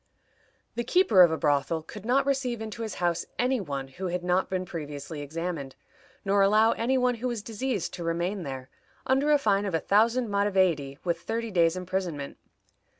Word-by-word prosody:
The 240 Hz, -, -2 dB
keeper 355 Hz, -, +4 dB
of 175 Hz, -, +8 dB
a 160 Hz, -, -1 dB
brothel 145 Hz, +3 st, +1 dB
could 210 Hz, +6 st, -10 dB
not 265 Hz, +2 st, +3 dB
receive 265 Hz, -4 st, 0 dB
into 220 Hz, +1 st, -6 dB
his 220 Hz, -2 st, -4 dB
house 175 Hz, -1 st, -1 dB
any 250 Hz, -1 st, +1 dB
one 140 Hz, -6 st, -4 dB
who 180 Hz, +8 st, -6 dB
had 180 Hz, 0 st, -3 dB
not 180 Hz, +1 st, +1 dB
been 185 Hz, -1 st, -2 dB
previously 150 Hz, -2 st, -6 dB
examined, 155 Hz, -2 st, -5 dB, 0.5 s
nor 200 Hz, 0 st, +3 dB
allow 215 Hz, +3 st, +5 dB
any 255 Hz, +3 st, 0 dB
one 250 Hz, -1 st, +2 dB
who 255 Hz, -, 0 dB
was 235 Hz, -4 st, -3 dB
diseased 225 Hz, -3 st, -3 dB
to 175 Hz, -, -6 dB
remain 170 Hz, +4 st, -1 dB
there, 135 Hz, -4 st, -7 dB, 0.3 s
under 270 Hz, +3 st, +2 dB
a 295 Hz, -, +6 dB
fine 205 Hz, -6 st, +1 dB
of 185 Hz, -, -1 dB
a -, -, +2 dB
thousand 230 Hz, +6 st, +2 dB
maravedis, 185 Hz, -9 st, +1 dB
with 170 Hz, -1 st, 0 dB
thirty 230 Hz, +5 st, -3 dB
days' 170 Hz, -2 st, +3 dB
imprisonment. 180 Hz, -6 st, -4 dB
190 Hz, 185 wpm, -27 LUFS, 165-230 Hz, 0.5 s, of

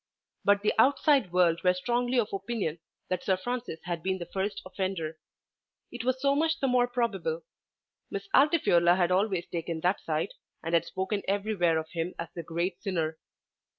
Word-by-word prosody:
But 200 Hz, 0 st, +3 dB
the 210 Hz, -, +3 dB
outside 275 Hz, -, +4 dB
world 175 Hz, -2 st, +3 dB
were 180 Hz, 0 st, +4 dB
strongly 245 Hz, +5 st, +1 dB
of 215 Hz, -3 st, -1 dB
opinion 195 Hz, -5 st, -2 dB, 0.3 s
that 185 Hz, -1 st, -1 dB
Sir 190 Hz, -2 st, +2 dB
Francis 240 Hz, -4 st, -4 dB
had 170 Hz, -2 st, -3 dB
been 190 Hz, +2 st, -1 dB
the 175 Hz, -, -6 dB
first 195 Hz, +3 st, -3 dB
offender. 185 Hz, -5 st, -3 dB, 0.7 s
It 240 Hz, -1 st, -5 dB
was 255 Hz, +1 st, 0 dB
so 275 Hz, +1 st, +3 dB
much 320 Hz, +3 st, +1 dB
the 270 Hz, -, +1 dB
more 250 Hz, -1 st, +3 dB
probable. 195 Hz, -10 st, -1 dB, 0.7 s
Miss 200 Hz, 0 st, -5 dB
Altifiorla 220 Hz, -, +5 dB
had 175 Hz, -1 st, +2 dB
always 190 Hz, -2 st, +1 dB
taken 165 Hz, -1 st, -4 dB
that 180 Hz, +4 st, +1 dB
side, 160 Hz, +4 st, -2 dB, 0.3 s
and 165 Hz, +1 st, -3 dB
had 170 Hz, -1 st, +3 dB
spoken 190 Hz, +3 st, -2 dB
everywhere 195 Hz, -4 st, +1 dB
of 160 Hz, 0 st, -4 dB
him 170 Hz, +1 st, -3 dB
as 170 Hz, -, -5 dB
the 170 Hz, -, -5 dB
great 170 Hz, +2 st, -3 dB
sinner. 165 Hz, -6 st, -2 dB
190 Hz, 175 wpm, -29 LUFS, 170-235 Hz, 0.7 s, Altifiorla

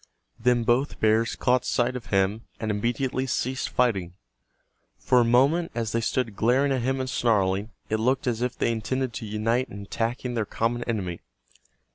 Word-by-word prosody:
Then 120 Hz, 0 st, +2 dB
both 125 Hz, +4 st, +1 dB
bears 110 Hz, +2 st, +2 dB
caught 125 Hz, 0 st, +2 dB
sight 125 Hz, 0 st, 0 dB
of 125 Hz, -, -6 dB
him, 100 Hz, +2 st, +1 dB, 0.2 s
and 110 Hz, -1 st, -1 dB
immediately 125 Hz, +5 st, -1 dB
ceased 130 Hz, +1 st, -1 dB
fighting. 95 Hz, -8 st, 0 dB, 0.8 s
For 125 Hz, -, +3 dB
a -, -, +5 dB
moment, 135 Hz, +9 st, +3 dB
as 115 Hz, -2 st, -2 dB
they 115 Hz, -, 0 dB
stood 115 Hz, -2 st, -1 dB
glaring 130 Hz, +6 st, +2 dB
at 130 Hz, -2 st, +1 dB
him 130 Hz, +2 st, 0 dB
and 130 Hz, -, -2 dB
snarling, 105 Hz, -4 st, +1 dB, 0.2 s
it 110 Hz, -, 0 dB
looked 130 Hz, +4 st, +1 dB
as 120 Hz, -2 st, -1 dB
if 125 Hz, 0 st, -2 dB
they -, -, +1 dB
intended 120 Hz, +3 st, -2 dB
to 110 Hz, -, -5 dB
unite 115 Hz, +4 st, 0 dB
in 100 Hz, -3 st, -8 dB
attacking 120 Hz, +4 st, -3 dB
their 115 Hz, -2 st, 0 dB
common 120 Hz, +3 st, -1 dB
enemy. 95 Hz, -7 st, -3 dB
120 Hz, 175 wpm, -26 LUFS, 110-125 Hz, 0.8 s, a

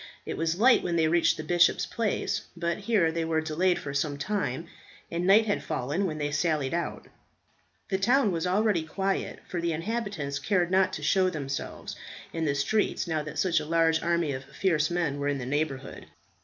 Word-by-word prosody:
It -, -, -4 dB
was 165 Hz, +2 st, -1 dB
light 245 Hz, +3 st, +6 dB
when 175 Hz, -1 st, -2 dB
they 160 Hz, -1 st, +3 dB
reached 170 Hz, +1 st, +3 dB
the 155 Hz, -, -5 dB
bishop's 175 Hz, +2 st, +3 dB
palace, 205 Hz, -2 st, -2 dB
but 170 Hz, +1 st, -1 dB
here 200 Hz, -6 st, +2 dB
they 165 Hz, 0 st, -1 dB
were 160 Hz, -1 st, +1 dB
delayed 170 Hz, +3 st, +1 dB
for 140 Hz, -, -6 dB
some 140 Hz, 0 st, -1 dB
time, 165 Hz, -3 st, -2 dB, 0.5 s
and 175 Hz, +2 st, -1 dB
night 210 Hz, +3 st, +6 dB
had 205 Hz, -, -1 dB
fallen 145 Hz, +10 st, -1 dB
when 155 Hz, -3 st, -4 dB
they 145 Hz, -1 st, -2 dB
sallied 145 Hz, -2 st, 0 dB
out. 170 Hz, 0 st, -3 dB, 0.8 s
The 190 Hz, -, 0 dB
town 240 Hz, +2 st, +3 dB
was 170 Hz, 0 st, -1 dB, 0.4 s
quiet, 195 Hz, +1 st, -2 dB
for 180 Hz, -3 st, -3 dB
the 170 Hz, -1 st, 0 dB
inhabitants 165 Hz, -6 st, -3 dB
cared 180 Hz, -4 st, +1 dB
not 190 Hz, 0 st, +3 dB
to 150 Hz, -, -5 dB
show 185 Hz, +4 st, +3 dB
themselves 140 Hz, -5 st, -5 dB, 0.4 s
in 165 Hz, -1 st, -1 dB
the 140 Hz, -2 st, +1 dB
streets 175 Hz, +10 st, 0 dB
now 160 Hz, -3 st, -1 dB
that 150 Hz, 0 st, -7 dB
such 175 Hz, -3 st, +2 dB
a -, -, -5 dB
large 165 Hz, 0 st, +3 dB
army 170 Hz, -3 st, +1 dB
of 130 Hz, 0 st, -5 dB
fierce 155 Hz, -1 st, 0 dB
men 165 Hz, -5 st, -1 dB
were 145 Hz, -, -1 dB
in 145 Hz, -1 st, 0 dB
the 130 Hz, -, -5 dB
neighbourhood. 140 Hz, 0 st, -3 dB
165 Hz, 195 wpm, -28 LUFS, 150-190 Hz, 0.8 s, light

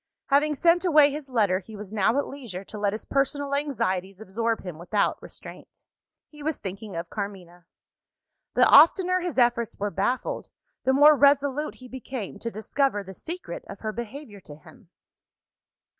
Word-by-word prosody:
Having 295 Hz, +2 st, +3 dB
sent 340 Hz, +5 st, +3 dB
away 300 Hz, -5 st, +5 dB
his 290 Hz, -1 st, -7 dB
letter, 205 Hz, -7 st, +2 dB
he 215 Hz, +3 st, -12 dB
was 205 Hz, 0 st, -9 dB
now 220 Hz, +4 st, +2 dB
at 285 Hz, -, +1 dB
leisure 235 Hz, -10 st, -7 dB
to 210 Hz, +2 st, -9 dB
let 205 Hz, -1 st, +1 dB
his 215 Hz, -, -6 dB
personal 280 Hz, +1 st, -1 dB
anxieties 195 Hz, -10 st, -2 dB
absorb 225 Hz, +2 st, -2 dB
him 175 Hz, -4 st, -7 dB
without 200 Hz, +4 st, 0 dB
restraint. -, -, -12 dB, 0.4 s
He 300 Hz, -1 st, -15 dB
was 310 Hz, +1 st, -2 dB
thinking 195 Hz, +1 st, -7 dB
of 170 Hz, 0 st, -5 dB
Carmina. 180 Hz, -5 st, -7 dB, 0.9 s
The -, -, +6 dB
oftener 365 Hz, +5 st, +6 dB
his 355 Hz, -4 st, -4 dB
efforts 240 Hz, -2 st, +2 dB
were 205 Hz, 0 st, -2 dB
baffled, 220 Hz, +7 st, -2 dB, 0.4 s
the 265 Hz, -, +3 dB
more 295 Hz, +3 st, +7 dB
resolute 285 Hz, +1 st, +2 dB
he 255 Hz, -, -13 dB
became 250 Hz, -5 st, -7 dB
to 230 Hz, -, -4 dB
discover 220 Hz, 0 st, -1 dB
the 190 Hz, 0 st, -10 dB
secret 345 Hz, -, -7 dB
of -, -, -9 dB
her 215 Hz, -, -2 dB
behaviour 235 Hz, -1 st, -8 dB
to 150 Hz, -5 st, -12 dB
him. 190 Hz, -, -18 dB
235 Hz, 165 wpm, -26 LUFS, 200-285 Hz, 0.9 s, more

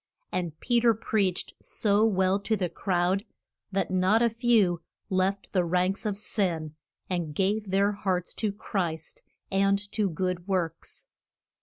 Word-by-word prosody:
And 170 Hz, -4 st, -3 dB
Pe 240 Hz, -1 st, +2 dB
ter 230 Hz, -1 st, +4 dB
preached 200 Hz, -4 st, 0 dB
so 210 Hz, 0 st, +2 dB
well 190 Hz, -2 st, +2 dB
to 200 Hz, +2 st, 0 dB
the 180 Hz, -3 st, -1 dB
crowd 180 Hz, +2 st, 0 dB, 0.5 s
that 195 Hz, -1 st, -1 dB
not 190 Hz, +5 st, +3 dB
a 235 Hz, -, +3 dB
few 220 Hz, -7 st, +3 dB, 0.3 s
left 190 Hz, +1 st, 0 dB
the 185 Hz, -3 st, +3 dB
ranks 180 Hz, +4 st, +1 dB
of 200 Hz, -2 st, -2 dB
sin 175 Hz, -7 st, -1 dB, 0.3 s
and 170 Hz, -5 st, -2 dB
gave 200 Hz, +3 st, 0 dB
their 200 Hz, +2 st, +3 dB
hearts 185 Hz, -3 st, -2 dB
to 215 Hz, -2 st, +1 dB
Christ, 175 Hz, -6 st, -3 dB, 0.3 s
and 195 Hz, +1 st, +3 dB
to 210 Hz, -3 st, +1 dB
good 180 Hz, +1 st, -2 dB
works. 175 Hz, -4 st, -3 dB
190 Hz, 145 wpm, -28 LUFS, 180-205 Hz, 0.5 s, ter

